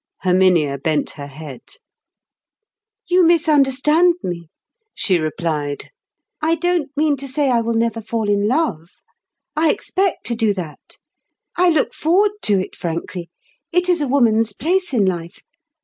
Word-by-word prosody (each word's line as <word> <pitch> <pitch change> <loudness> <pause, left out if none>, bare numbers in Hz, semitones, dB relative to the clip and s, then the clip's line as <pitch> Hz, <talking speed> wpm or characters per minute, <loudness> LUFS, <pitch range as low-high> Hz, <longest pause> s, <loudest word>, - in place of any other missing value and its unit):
Herminia 180 -6 +3
bent 155 +2 -1
her 140 -1 -8
head. 140 -2 -10 1.5
"You 360 +1 +4
misunderstand 315 0 +3
me," 170 -2 -5 0.5
she 185 -5 +2
replied. 155 -2 -3 0.5
"I 325 +2 +2
don't 350 -3 0
mean 300 -1 +2
to 275 +1 -7
say 275 0 0
I 235 -1 +3
will 230 0 -2
never 230 0 0
fall 225 0 -3
in 205 0 +1
love. 225 - -1 0.7
I 315 +1 +3
expect 385 +4 -1
to 235 - 0
do 220 -3 +1
that. 170 -5 -8 0.6
I 360 0 +4
look 315 -4 +1
forward 380 +6 +2
to 205 -2 +3
it 185 - -5
frankly—it 175 - -5
is 350 -3 +2
a 290 - 0
woman's 225 -5 +2
place 360 - -1
in 225 -7 +2
life. 175 0 -3
230 Hz, 140 wpm, -19 LUFS, -, 1.5 s, You